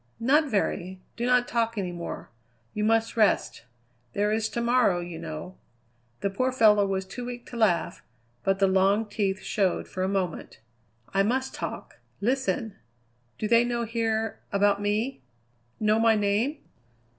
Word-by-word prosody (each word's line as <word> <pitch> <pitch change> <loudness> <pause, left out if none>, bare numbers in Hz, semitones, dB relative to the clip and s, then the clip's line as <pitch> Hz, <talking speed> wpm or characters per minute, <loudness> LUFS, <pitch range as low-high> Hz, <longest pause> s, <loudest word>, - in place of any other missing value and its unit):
"Not 285 +5 +3
very. 190 -4 -1 0.2
Do 240 +1 -2
not 250 -1 +3
talk 230 -1 0
any 185 -3 -2
more. 170 -7 -7 0.4
You 210 - -2
must 225 +1 +2
rest. 215 - +2 0.5
There 205 +1 +1
is 220 0 0
to - - -3
morrow, 235 -6 +3
you 175 -2 -6
know." 165 +3 -7 0.6
The 200 - 0
poor 255 +6 0
fellow 210 -5 +5
was 190 -1 -1
too 195 +6 -7
weak 245 0 -6
to - - -7
laugh, 205 -8 +1 0.4
but 195 0 +2
the 195 - +3
long 195 +3 +3
teeth 200 -2 -2
showed 195 -4 0
for 185 - -5
a 185 - +1
moment. 190 -4 -3 0.5
"I 195 - +3
must 260 +6 0
talk. - - -6 0.2
Listen! 250 0 -1 0.6
Do 215 - -2
they 230 +1 +5
know 240 -1 -1
here 225 -1 -1
about 200 0 +2
me? 210 - -1 0.6
know 215 0 +3
my 225 -1 +5
name?" 210 +8 +1
215 Hz, 155 wpm, -27 LUFS, 195-235 Hz, 0.6 s, fellow